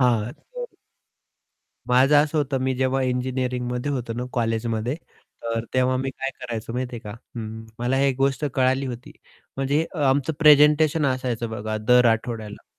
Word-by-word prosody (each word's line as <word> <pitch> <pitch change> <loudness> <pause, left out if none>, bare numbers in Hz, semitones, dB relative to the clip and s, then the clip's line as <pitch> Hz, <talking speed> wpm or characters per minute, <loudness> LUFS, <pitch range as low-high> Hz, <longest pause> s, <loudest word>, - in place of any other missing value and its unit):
हां. 120 -2 +2
तर - - -9 1.2
माझं 130 +4 +5
असं 155 +1 -1
होतं 140 -2 0
मी 130 0 0
जेव्हा 130 +1 +1
इंजिनिअरिंगमध्ये 125 +1 -1
होतो 120 -3 -3
ना, 125 +2 -3
कॉलेजमध्ये, 115 +1 -1 0.5
तर 115 0 -2
तेव्हा 130 0 +3
मी 135 +1 -2
काय 135 +1 -4
करायचो 115 -2 -5
माहिती 125 0 -3
आहे - - -8
का? 105 - -8 0.3
हं, 110 0 -6
मला 125 +3 0
एक 135 -2 +2
गोष्ट 135 +2 +1
कळाली 130 +1 +2
होती. 120 -1 -7 0.4
म्हणजे 140 +4 +1
अ, 160 - -5
आमचं 140 +3 +1
प्रेझेंटेशन 150 0 +5
असायचं 125 -3 -1
बघा 110 0 -3
दर 125 0 +6
आठवड्याला. 110 -2 -5
125 Hz, 155 wpm, -24 LUFS, 115-135 Hz, 1.2 s, दर